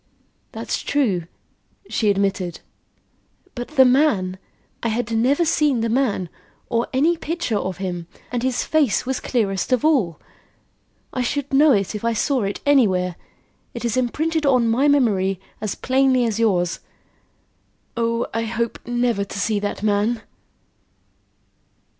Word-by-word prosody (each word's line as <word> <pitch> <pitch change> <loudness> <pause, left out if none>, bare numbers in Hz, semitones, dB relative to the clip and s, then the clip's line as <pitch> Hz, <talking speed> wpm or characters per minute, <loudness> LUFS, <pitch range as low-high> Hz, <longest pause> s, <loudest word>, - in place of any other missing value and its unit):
"That's - - -3
true," 205 - 0 0.6
she 215 - 0
admitted. 195 -3 -1 0.9
"But 245 -1 -5
the 275 -4 +5
man! 245 -9 +2 0.4
I - - -1
had 230 +1 -2
never 260 +9 +2
seen 300 -6 +2
the 230 - 0
man, 225 -7 0 0.4
or 235 -1 0
any 305 +7 +3
picture 320 -9 -2
of 185 -2 -4
him, 175 -3 -4 0.2
and 245 -1 -1
his 255 -1 0
face 290 -7 +1
was 265 0 -2
clearest 200 -6 -1
of 255 +2 +2
all. 235 - +2 0.9
I 255 - -1
should 280 +3 -2
know 295 +2 +6
it 200 -5 +1
if 210 - -5
I 230 0 +1
saw 265 +3 +1
it 200 - -4
anywhere. 190 -11 +3 0.6
It 235 - -4
is 230 - 0
imprinted 310 +6 0
on 255 -5 +3
my 265 +6 +3
memory 200 -10 +2 0.2
as 215 -3 -2
plainly 260 -1 +2
as 225 -1 -1
yours. 180 -6 +1 1.2
Oh, 230 0 0
I 225 0 -1
hope 230 +1 -2
never 240 -3 0
to 200 - -7
see 210 0 0
that 205 0 -4
man!" 215 +2 +1
235 Hz, 140 wpm, -22 LUFS, 200-265 Hz, 1.2 s, know